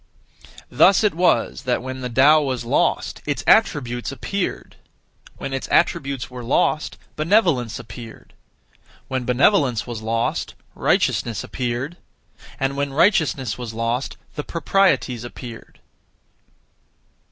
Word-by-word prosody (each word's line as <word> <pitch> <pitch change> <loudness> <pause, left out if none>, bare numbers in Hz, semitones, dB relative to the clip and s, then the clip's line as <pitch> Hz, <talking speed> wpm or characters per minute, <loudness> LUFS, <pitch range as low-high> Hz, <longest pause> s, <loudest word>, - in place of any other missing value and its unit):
Thus 195 +2 +5
it 210 - +3
was 175 +2 +1
that 125 -2 -1
when 130 0 -6
the 125 - -3
Tao 140 +6 +5
was 130 -4 -2
lost, - - 0
its - - -2
attributes 120 -2 +2
appeared; 180 +8 -4 0.6
when 135 - -5
its 135 - -3
attributes 140 -7 +1
were 125 -1 -9
lost, 145 +5 0 0.2
benevolence 155 - +2
appeared; 110 +2 -11 0.8
when 130 -2 -2
benevolence 125 - +3
was 120 -3 -6
lost, 115 +1 -2 0.2
righteousness 115 -4 0
appeared; 130 +6 -3 0.6
and 135 +1 0
when 140 -1 -2
righteousness 135 - +2
was 115 -3 -6
lost, 115 +3 -2 0.2
the 150 - -4
proprieties 165 - +1
appeared. 120 -1 -10
130 Hz, 115 wpm, -22 LUFS, 120-150 Hz, 0.8 s, Thus